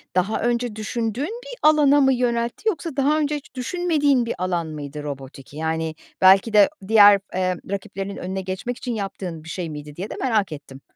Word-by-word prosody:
daha 185 Hz, +4 st, +1 dB
önce 240 Hz, -1 st, 0 dB
düşündüğün 225 Hz, +3 st, -2 dB, 0.2 s
bir -, -, -10 dB
alana 295 Hz, -2 st, +5 dB
mı 270 Hz, -1 st, +4 dB
yöneltti 240 Hz, -, -1 dB
yoksa 335 Hz, -6 st, -4 dB
daha 290 Hz, +3 st, +3 dB
önce 300 Hz, 0 st, 0 dB
hiç 290 Hz, -, -9 dB
düşünmediğin 290 Hz, -3 st, +1 dB
bir 230 Hz, -, -3 dB
alan 175 Hz, -2 st, -1 dB
mıydı 150 Hz, -1 st, -7 dB
robotik? 135 Hz, -1 st, -8 dB
Yani, 160 Hz, +1 st, -2 dB, 0.3 s
belki 190 Hz, +4 st, +6 dB
de 205 Hz, -2 st, +7 dB, 0.2 s
diğer, 205 Hz, -2 st, +7 dB
emm, 185 Hz, -1 st, 0 dB
rakiplerinin 195 Hz, 0 st, -4 dB
önüne 190 Hz, +1 st, -4 dB
geçmek 190 Hz, +6 st, -4 dB
için 245 Hz, -2 st, -4 dB
yaptığın 190 Hz, -5 st, -5 dB
bir 160 Hz, -, -11 dB
şey 175 Hz, -1 st, -4 dB
miydi 150 Hz, -1 st, -8 dB
diye 190 Hz, +6 st, -5 dB
de -, -, -6 dB
merak 220 Hz, -8 st, +1 dB
ettim. 140 Hz, -2 st, -10 dB
205 Hz, 180 wpm, -22 LUFS, 170-250 Hz, 0.3 s, de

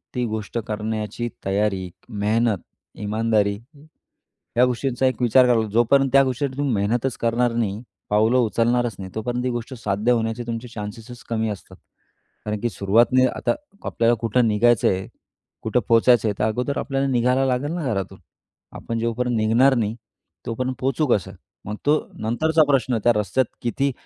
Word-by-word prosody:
ती 125 Hz, -1 st, 0 dB
गोष्ट 110 Hz, +1 st, -4 dB
करण्याची 110 Hz, +1 st, -3 dB, 0.2 s
तयारी, 95 Hz, -1 st, 0 dB, 0.2 s
मेहनत, 110 Hz, +1 st, +1 dB, 0.4 s
इमानदारी. 105 Hz, -1 st, 0 dB, 1.0 s
या 125 Hz, -, +6 dB
गोष्टींचा 125 Hz, +1 st, -1 dB
एक 130 Hz, -1 st, 0 dB
विचार 125 Hz, +2 st, +5 dB
करा, 115 Hz, -2 st, +3 dB
जोपर्यंत 135 Hz, +4 st, +4 dB
त्या 135 Hz, 0 st, +7 dB
गोष्टीसाठी 130 Hz, +1 st, -2 dB
तुम्ही 140 Hz, -4 st, 0 dB
मेहनतच 115 Hz, +5 st, 0 dB
करणार 120 Hz, +1 st, +1 dB
नाही, 110 Hz, -2 st, -1 dB, 0.3 s
पाऊलं 110 Hz, +4 st, +3 dB
उचलणारच 120 Hz, 0 st, +1 dB
नाही 95 Hz, -1 st, -7 dB
तोपर्यंत 120 Hz, +3 st, -2 dB
ती 130 Hz, -, 0 dB
गोष्ट 120 Hz, +2 st, -5 dB
साध्य 105 Hz, 0 st, 0 dB
होण्याचे 115 Hz, 0 st, 0 dB
तुमचे 115 Hz, +1 st, -4 dB
चान्सेसच 115 Hz, +3 st, -8 dB
कमी 110 Hz, -1 st, 0 dB
असतात. 100 Hz, -, -8 dB, 0.7 s
कारण 105 Hz, -1 st, -2 dB
की 120 Hz, -, 0 dB
सुरुवातने 115 Hz, +6 st, +3 dB
आता -, -, 0 dB, 0.3 s
आपल्याला 115 Hz, +1 st, +2 dB
कुठं 115 Hz, +1 st, +2 dB
निघायचंय? 105 Hz, -3 st, +2 dB, 0.6 s
कुठं -, -, +1 dB
पोहोचायचं 115 Hz, 0 st, +5 dB
आहे? 105 Hz, -, +1 dB
तर -, -, +1 dB
अगोदर 125 Hz, +6 st, -1 dB
आपल्याला 135 Hz, 0 st, -1 dB
निघायला 125 Hz, +1 st, +2 dB
लागेल 130 Hz, +4 st, 0 dB
ना 175 Hz, -3 st, -3 dB
घरातून. 95 Hz, -2 st, -4 dB, 0.5 s
आपण 115 Hz, 0 st, -4 dB
जोपर्यंत 120 Hz, +1 st, -1 dB
निघणार 115 Hz, +5 st, +4 dB
नाही 110 Hz, -2 st, -1 dB, 0.5 s
तोपर्यंत 130 Hz, +3 st, -2 dB
पोहचू 135 Hz, +3 st, 0 dB
कसं. 100 Hz, -6 st, +1 dB, 0.3 s
मग 105 Hz, -, -4 dB
तो 150 Hz, +1 st, +4 dB, 0.2 s
नंतरचा 155 Hz, +9 st, +2 dB
प्रश्न 130 Hz, -4 st, +2 dB
त्या 120 Hz, -, +5 dB
रस्त्यात 105 Hz, +5 st, +1 dB, 0.2 s
किती 135 Hz, +4 st, 0 dB
115 Hz, 150 wpm, -22 LUFS, 110-125 Hz, 1.0 s, त्या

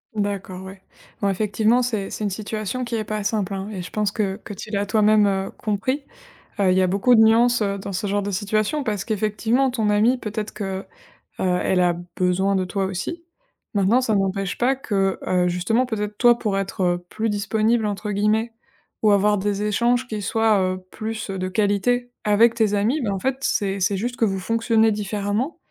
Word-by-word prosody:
D'accord, 200 Hz, -3 st, -3 dB
ouais. 190 Hz, 0 st, -10 dB, 0.4 s
Bon, 200 Hz, -, +2 dB
effectivement, 215 Hz, +4 st, +2 dB
c'est 215 Hz, -5 st, -2 dB
c'est -, -, -5 dB
une 205 Hz, -, 0 dB
situation 215 Hz, +4 st, -4 dB
qui 235 Hz, 0 st, -3 dB
est 220 Hz, -, -1 dB
pas 215 Hz, 0 st, -3 dB
simple, 205 Hz, -1 st, -1 dB
hein 195 Hz, +1 st, -4 dB
et 200 Hz, -4 st, -5 dB
je 175 Hz, -, -8 dB
pense 210 Hz, -2 st, 0 dB
que 200 Hz, -3 st, -2 dB
que 205 Hz, -, -7 dB
tu 210 Hz, +2 st, -9 dB
l'as 200 Hz, -1 st, 0 dB
toi-même, 210 Hz, +1 st, +4 dB
heu, 195 Hz, -1 st, -1 dB
compris. 225 Hz, +7 st, -1 dB, 0.6 s
Heu, 195 Hz, -2 st, +3 dB
il -, -, +2 dB
y 190 Hz, -, +4 dB
a -, -, +3 dB
beaucoup 200 Hz, +7 st, +3 dB
de 225 Hz, -, +6 dB
nuances, 230 Hz, +1 st, +4 dB
heu, 200 Hz, -1 st, -1 dB
dans 195 Hz, +1 st, -6 dB
ce 190 Hz, +2 st, -2 dB
genre 205 Hz, +1 st, 0 dB
de 200 Hz, -, -3 dB
situation 215 Hz, +8 st, 0 dB
parce 210 Hz, -4 st, -2 dB
qu'effectivement, 220 Hz, +4 st, +1 dB
ton 225 Hz, -4 st, -1 dB
amie 220 Hz, +5 st, +3 dB
peut-être 215 Hz, -2 st, -4 dB
que, 195 Hz, -1 st, -4 dB, 0.6 s
heu, 180 Hz, -1 st, +1 dB
elle 185 Hz, -1 st, +2 dB
a 175 Hz, -1 st, +3 dB, 0.2 s
besoin 185 Hz, +2 st, +1 dB
de 190 Hz, -, +1 dB
toi 195 Hz, +1 st, -2 dB
aussi. 195 Hz, -, -4 dB, 0.5 s
Maintenant, 205 Hz, +5 st, +3 dB
ça 225 Hz, -4 st, +1 dB
n'empêche 195 Hz, -1 st, -1 dB
pas 255 Hz, +3 st, +2 dB
que, 195 Hz, -7 st, -1 dB
heu, 180 Hz, -1 st, +2 dB
justement, 180 Hz, +8 st, +1 dB
peut-être 210 Hz, -3 st, -4 dB
toi, 240 Hz, 0 st, +5 dB
pour 210 Hz, -4 st, -1 dB
être, 195 Hz, 0 st, -3 dB
heu, 175 Hz, 0 st, 0 dB
plus 225 Hz, +1 st, -2 dB
disponible, 220 Hz, +2 st, +1 dB
entre 210 Hz, 0 st, -3 dB
guillemets, 215 Hz, +3 st, +1 dB, 0.5 s
ou 215 Hz, -, +4 dB
avoir 205 Hz, +1 st, +3 dB
des 205 Hz, +1 st, -1 dB
échanges 240 Hz, +4 st, +1 dB
qui 215 Hz, -3 st, -4 dB
soient, 220 Hz, +1 st, +2 dB
heu, 185 Hz, 0 st, 0 dB
plus, 220 Hz, -1 st, -5 dB
heu, 190 Hz, -, -4 dB
de 185 Hz, -, -2 dB
qualité 215 Hz, +5 st, +1 dB
avec 220 Hz, +3 st, +4 dB
tes 220 Hz, -3 st, +1 dB
amis. 230 Hz, +9 st, +1 dB
Ben, 220 Hz, -5 st, -1 dB
en 195 Hz, -, -2 dB
fait, 265 Hz, +6 st, -1 dB
c'est 200 Hz, -6 st, 0 dB
c'est 195 Hz, +1 st, +1 dB
juste 240 Hz, +5 st, -3 dB
que 230 Hz, -, +2 dB
vous 195 Hz, -2 st, -1 dB
fonctionnez 225 Hz, +2 st, +2 dB
différemment 210 Hz, -, -2 dB
210 Hz, 210 wpm, -22 LUFS, 195-225 Hz, 0.6 s, de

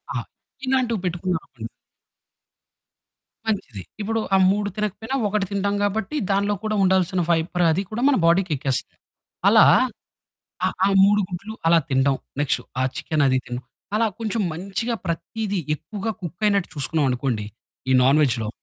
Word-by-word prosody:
ఆ! -, -, 0 dB, 0.5 s
ఇలాంటివి 250 Hz, -6 st, +1 dB
పెట్టుకున్నాం 180 Hz, -1 st, -1 dB
అనుకొండి. 115 Hz, -3 st, -9 dB, 1.8 s
మంచిది. 165 Hz, -, -3 dB, 0.2 s
ఇప్పుడు 225 Hz, +2 st, -1 dB, 0.2 s
ఆ -, -, +6 dB
3 205 Hz, 0 st, -1 dB
తినకపోయినా 210 Hz, +5 st, -3 dB
ఒకటి 205 Hz, -1 st, 0 dB
తింటాం 200 Hz, 0 st, 0 dB
కాబట్టి 205 Hz, +7 st, -1 dB, 0.2 s
దానిలో 200 Hz, +1 st, +1 dB
కూడా 215 Hz, 0 st, -1 dB
ఉండాల్సిన 185 Hz, -1 st, +2 dB
ఫైబర్ 170 Hz, +2 st, +1 dB
అది 190 Hz, +5 st, 0 dB
కూడా 230 Hz, +3 st, -3 dB
మన 275 Hz, -, +4 dB
బాడీకెక్కేస్తది. 165 Hz, -7 st, +1 dB, 0.5 s
అలా -, -, +7 dB, 1.0 s
ఆ! -, -, +3 dB, 0.2 s
ఆ -, -, +5 dB, 0.2 s
3 205 Hz, +1 st, +5 dB
గుడ్లు 200 Hz, +5 st, -6 dB
అలా 165 Hz, 0 st, +6 dB
తిండం. 135 Hz, +1 st, +2 dB, 0.2 s
నెక్స్టు 145 Hz, -, +1 dB, 0.2 s
ఆ -, -, +2 dB
చికెను 150 Hz, -3 st, 0 dB
అది 130 Hz, 0 st, +3 dB
తిన 120 Hz, 0 st, -4 dB, 0.4 s
అలా 225 Hz, +1 st, +3 dB
కొంచెం 225 Hz, 0 st, -2 dB
మంచిగా 195 Hz, +7 st, -3 dB
ప్రతీదీ 205 Hz, +4 st, -3 dB, 0.2 s
ఎక్కువగా 210 Hz, +6 st, -5 dB
కుక్కయినట్టు 200 Hz, +3 st, 0 dB
చూసుకున్నాం 145 Hz, +1 st, +1 dB
అనుకోండి. 120 Hz, -4 st, -2 dB, 0.4 s
ఈ -, -, +5 dB
నాన్ 135 Hz, +4 st, +5 dB
వేజ్‌లో. 115 Hz, -6 st, 0 dB
190 Hz, 140 wpm, -23 LUFS, 150-210 Hz, 1.8 s, అలా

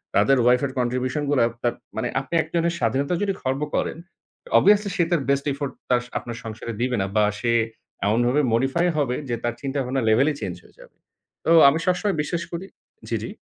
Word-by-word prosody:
তাদের 135 Hz, 0 st, +4 dB
ওয়াইফ 125 Hz, +1 st, +4 dB
এর 135 Hz, -, -3 dB
Contribution 130 Hz, +4 st, -1 dB
গুলা 145 Hz, -4 st, +3 dB, 0.2 s
তাপ 120 Hz, -, +1 dB, 0.2 s
মানে -, -, -1 dB
আপনি -, -, -9 dB
একজনের 170 Hz, +1 st, -1 dB
স্বাধীনতার 140 Hz, -, 0 dB
যদি 200 Hz, -1 st, 0 dB
খর্ব 130 Hz, +2 st, -1 dB
করেন -, -, -1 dB, 0.6 s
Obviously 205 Hz, 0 st, +4 dB
সে 175 Hz, -, +3 dB
তার 170 Hz, -4 st, +2 dB
Best 140 Hz, 0 st, +1 dB
effort 140 Hz, -1 st, -4 dB, 0.2 s
তার, 125 Hz, -1 st, +3 dB, 0.2 s
আপনার 120 Hz, -1 st, -6 dB
সংসারে 115 Hz, +1 st, -6 dB
দিবে 125 Hz, 0 st, +1 dB
না 95 Hz, -, -1 dB
বা 105 Hz, -, +4 dB, 0.2 s
সে 120 Hz, +1 st, 0 dB, 0.5 s
এমনভাবে 120 Hz, +7 st, +2 dB
modify 135 Hz, +9 st, +1 dB
হবে 135 Hz, -4 st, +1 dB
যে 120 Hz, -, 0 dB
তার 120 Hz, -, 0 dB
চিন্তাভাবনার 135 Hz, -2 st, -2 dB
লেভেলই 135 Hz, +8 st, +4 dB
চেঞ্জ 90 Hz, -, -3 dB
হয়ে -, -, -22 dB
যাবে। -, -, -16 dB, 0.5 s
তো -, -, +2 dB, 0.2 s
আমি 155 Hz, +4 st, 0 dB
সবসময় 185 Hz, +2 st, +1 dB
বিশ্বাস 170 Hz, +3 st, -3 dB
করি 175 Hz, +3 st, -5 dB, 0.4 s
জি, -, -, 0 dB
জি। -, -, -5 dB
135 Hz, 190 wpm, -23 LUFS, 120-160 Hz, 0.6 s, তাদের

